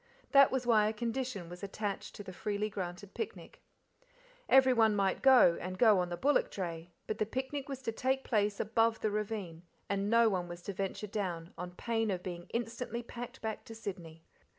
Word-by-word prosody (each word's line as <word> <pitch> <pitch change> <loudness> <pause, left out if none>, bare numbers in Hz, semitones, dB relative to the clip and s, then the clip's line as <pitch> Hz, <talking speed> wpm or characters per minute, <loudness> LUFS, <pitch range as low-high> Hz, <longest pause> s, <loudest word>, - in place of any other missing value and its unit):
That 275 -1 +8
was 260 -2 -1
why 220 -3 +5
a 215 - 0
condition 230 -4 -3
was 175 +1 -10
attached 200 0 -4
to 205 - -7
the 185 - -8
freely 210 +3 -2
granted 185 0 -6
picnic. - - -6 0.9
Everyone 250 -5 +6
might 195 -2 +1
go, 255 -10 +6
and 185 +1 -5
go 215 -2 +6
on 180 -1 0
the 175 - -4
bullock 285 +7 +2
dray, 170 -3 -5 0.2
but 215 - -4
the 215 - +2
picnic 265 +3 -4
was 265 -1 -5
to 225 - -1
take 265 +4 0
place 205 -3 +1
above 225 +1 +2
the 215 - +1
ravine, 205 -6 -3 0.3
and 200 0 -1
no 230 0 +5
one 185 -4 0
was 175 0 -8
to 200 - -4
venture 195 +2 -3
down, 180 -5 -4
on 180 0 -6
pain 225 0 -1
of 180 -2 -2
being 175 -1 -6
instantly 235 +1 -3
packed 240 0 -8
back 220 -1 -3
to 225 - -9
Sydney. 175 -7 -7
210 Hz, 195 wpm, -33 LUFS, 185-235 Hz, 0.9 s, That